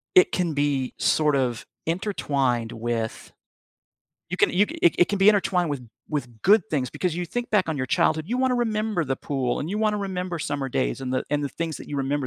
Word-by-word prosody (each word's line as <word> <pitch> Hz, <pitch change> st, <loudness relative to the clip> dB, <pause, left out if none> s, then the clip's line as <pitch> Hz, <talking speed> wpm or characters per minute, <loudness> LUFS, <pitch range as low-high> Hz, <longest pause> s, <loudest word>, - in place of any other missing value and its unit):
it 370 Hz, +2 st, +7 dB
can 175 Hz, -4 st, 0 dB
be 145 Hz, -3 st, 0 dB
sort 150 Hz, -2 st, +3 dB
of 125 Hz, -4 st, -1 dB, 0.2 s
intertwined 140 Hz, -, 0 dB
with 115 Hz, -1 st, -3 dB, 1.0 s
you 180 Hz, -, -2 dB
can -, -, +4 dB
you 195 Hz, +3 st, +4 dB
ca -, -, -8 dB
it 170 Hz, -, +5 dB, 0.2 s
it 200 Hz, -, +1 dB
be 195 Hz, +2 st, +6 dB
intertwined 185 Hz, -5 st, +3 dB
with 140 Hz, -3 st, -3 dB, 0.3 s
with 120 Hz, -7 st, -4 dB
good 205 Hz, -, +5 dB
things, 135 Hz, -5 st, 0 dB
because 180 Hz, -3 st, -2 dB
you 175 Hz, +1 st, -3 dB
think 245 Hz, +7 st, -4 dB
back 200 Hz, -5 st, +2 dB
on 160 Hz, -, -1 dB
your 130 Hz, -, -1 dB
childhood, 155 Hz, +5 st, +2 dB
you 245 Hz, +5 st, -1 dB
wanna 260 Hz, -1 st, +2 dB
remember 215 Hz, -6 st, 0 dB
the 135 Hz, -1 st, -1 dB
pool, 130 Hz, -4 st, -2 dB
and 150 Hz, -, -3 dB
you 200 Hz, -, -2 dB
wanna 215 Hz, -1 st, +1 dB
remember 180 Hz, -3 st, -3 dB
summer 145 Hz, -2 st, -2 dB
days, -, -, -1 dB
and 130 Hz, -1 st, -3 dB
the 130 Hz, -, +1 dB
and 145 Hz, 0 st, +1 dB
the -, -, -1 dB
things 165 Hz, -2 st, -3 dB
that -, -, -10 dB
you 145 Hz, -, -4 dB
remember 140 Hz, 0 st, -1 dB
155 Hz, 220 wpm, -25 LUFS, 135-195 Hz, 1.0 s, it